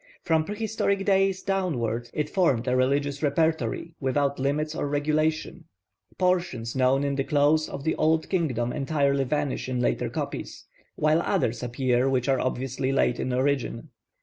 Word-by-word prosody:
From 160 Hz, -2 st, +2 dB
prehistoric 205 Hz, -1 st, -1 dB
days 195 Hz, -1 st, +2 dB
downward 120 Hz, -, -1 dB
it 150 Hz, -1 st, -2 dB
formed 140 Hz, -, +1 dB
a 125 Hz, -, +2 dB
religious 140 Hz, +2 st, +1 dB
repertory 160 Hz, +2 st, 0 dB
without 140 Hz, +1 st, 0 dB
limits 150 Hz, +3 st, 0 dB
or 145 Hz, -, -2 dB
regulation. 155 Hz, +2 st, -1 dB, 0.5 s
Portions 175 Hz, -11 st, 0 dB
known 130 Hz, +1 st, +3 dB
in 140 Hz, 0 st, 0 dB
the 135 Hz, 0 st, 0 dB
close 150 Hz, +2 st, +2 dB
of 140 Hz, -, -6 dB
the 160 Hz, -, +1 dB
old 160 Hz, +1 st, +2 dB
kingdom 125 Hz, -, -1 dB
entirely 140 Hz, -1 st, +1 dB
vanish 145 Hz, -1 st, -2 dB
in 125 Hz, -1 st, -1 dB
later 120 Hz, -, 0 dB
copies, -, -, -5 dB, 0.3 s
while 155 Hz, +2 st, +2 dB
others 115 Hz, -7 st, 0 dB
appear 125 Hz, +1 st, +1 dB
which 130 Hz, -2 st, 0 dB
are 135 Hz, -1 st, +2 dB
obviously 130 Hz, +1 st, -2 dB
late 135 Hz, -2 st, +1 dB
in 130 Hz, -, -2 dB
origin. 130 Hz, 0 st, -1 dB
140 Hz, 150 wpm, -26 LUFS, 130-160 Hz, 0.5 s, known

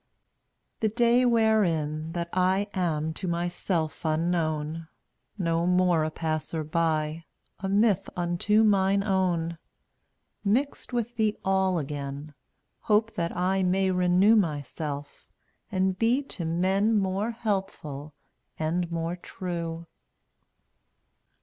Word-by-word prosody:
The 220 Hz, -, +2 dB
day 240 Hz, +2 st, +3 dB
wherein 170 Hz, -9 st, +2 dB
that 170 Hz, -1 st, -2 dB
I 190 Hz, +2 st, +2 dB
Am 160 Hz, -4 st, -1 dB
to 185 Hz, +4 st, -5 dB
myself 170 Hz, -2 st, -2 dB
unknown 160 Hz, -1 st, -1 dB, 0.3 s
— -, -, -47 dB
No 170 Hz, -2 st, 0 dB
more 180 Hz, -3 st, +3 dB
a 155 Hz, -, 0 dB
passer 155 Hz, 0 st, -3 dB
by, 160 Hz, 0 st, -1 dB, 0.3 s
A 195 Hz, -, -3 dB
myth 200 Hz, -1 st, +2 dB
unto 175 Hz, +5 st, +2 dB
mine 200 Hz, -1 st, +3 dB
own 175 Hz, -4 st, 0 dB, 0.4 s
— -, -, -49 dB
Mixed 250 Hz, +9 st, 0 dB
with 240 Hz, -1 st, -2 dB
the 215 Hz, -1 st, +1 dB
All 190 Hz, -1 st, +2 dB
again, 145 Hz, 0 st, -5 dB, 0.5 s
Hope 215 Hz, +1 st, +2 dB
that 170 Hz, 0 st, -3 dB
I 190 Hz, +2 st, +1 dB
may 190 Hz, +1 st, +2 dB
renew 180 Hz, +4 st, +4 dB
Myself, 145 Hz, -, -3 dB, 0.4 s
and 190 Hz, -1 st, 0 dB
be 240 Hz, +5 st, +2 dB
to 170 Hz, -, -4 dB
men 190 Hz, +6 st, +2 dB
More 195 Hz, +2 st, 0 dB
helpful 190 Hz, -10 st, -4 dB, 0.4 s
and 170 Hz, +2 st, -1 dB
more 165 Hz, +1 st, -2 dB
true. 170 Hz, -2 st, -5 dB
180 Hz, 115 wpm, -27 LUFS, 160-200 Hz, 0.5 s, renew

